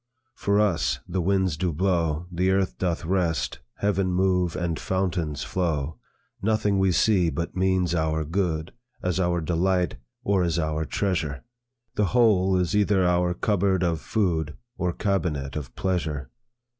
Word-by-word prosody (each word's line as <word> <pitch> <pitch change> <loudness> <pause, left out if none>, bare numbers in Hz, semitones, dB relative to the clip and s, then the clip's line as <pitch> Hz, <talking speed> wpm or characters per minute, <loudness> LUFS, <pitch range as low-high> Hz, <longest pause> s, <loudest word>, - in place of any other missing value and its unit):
"For 100 -3 +1
us, 95 -7 +1
the 90 0 -1
winds 95 -3 +1
do 90 +2 0
blow, 85 -1 0
The 90 +2 +1
earth 95 0 0
doth 85 -3 -1
rest, 85 -8 0 0.2
heaven 100 -2 0
move, 90 -2 +1
and 85 -2 -2
fountains 90 -6 -1
flow; 80 -5 -2 0.4
Nothing 105 -1 +1
we 95 -1 +3
see, 90 -1 +3
but 85 +3 -4
means 95 -2 +1
our 80 -1 0
good, 80 -2 -1 0.3
As 90 0 0
our 85 -1 +1
delight, 90 +1 +1 0.3
or 100 -2 +2
as 85 -1 0
our 80 -1 -1
treasure; 75 -10 -1 0.5
The 105 - +1
whole 95 -5 +4
is 90 +2 0
either 100 -2 +3
our 90 0 +2
cupboard 95 -1 +1
of 85 -3 0
food, 80 -8 -1 0.2
Or 90 -5 -1
cabinet 85 -9 -1
of 70 -5 -6
pleasure. 80 -8 -2
90 Hz, 145 wpm, -25 LUFS, 80-95 Hz, 0.5 s, whole